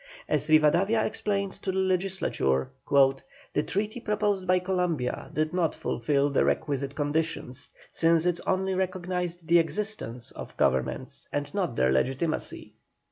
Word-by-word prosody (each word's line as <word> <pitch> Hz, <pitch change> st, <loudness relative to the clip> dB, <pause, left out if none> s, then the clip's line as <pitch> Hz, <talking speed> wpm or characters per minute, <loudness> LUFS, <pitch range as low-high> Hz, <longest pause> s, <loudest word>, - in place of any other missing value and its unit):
As 150 Hz, -1 st, +1 dB
Rivadavia 170 Hz, +8 st, +4 dB
explained 200 Hz, -2 st, -1 dB
to 190 Hz, -, -1 dB
the 190 Hz, -, -3 dB
Legislature: 185 Hz, -, 0 dB, 0.8 s
"The -, -, +2 dB
treaty 215 Hz, +4 st, -2 dB
proposed 205 Hz, -4 st, 0 dB
by 185 Hz, 0 st, +4 dB
Columbia 180 Hz, -8 st, -1 dB
did 155 Hz, +1 st, -1 dB
not 175 Hz, -4 st, +1 dB
fulfil 140 Hz, +4 st, 0 dB
the 140 Hz, -, +3 dB
requisite 140 Hz, -2 st, -1 dB
conditions, 145 Hz, -3 st, -2 dB, 0.2 s
since 165 Hz, 0 st, +3 dB
it 175 Hz, -1 st, +1 dB
only 190 Hz, 0 st, +1 dB
recognised 180 Hz, -2 st, -2 dB
the 170 Hz, 0 st, +6 dB
existence 165 Hz, -, -2 dB
of -, -, -9 dB
governments 65 Hz, -1 st, 0 dB
and 145 Hz, 0 st, -3 dB
not 185 Hz, -, -1 dB
their 65 Hz, 0 st, +3 dB
legitimacy." 135 Hz, -, -1 dB
170 Hz, 135 wpm, -27 LUFS, 145-190 Hz, 0.8 s, the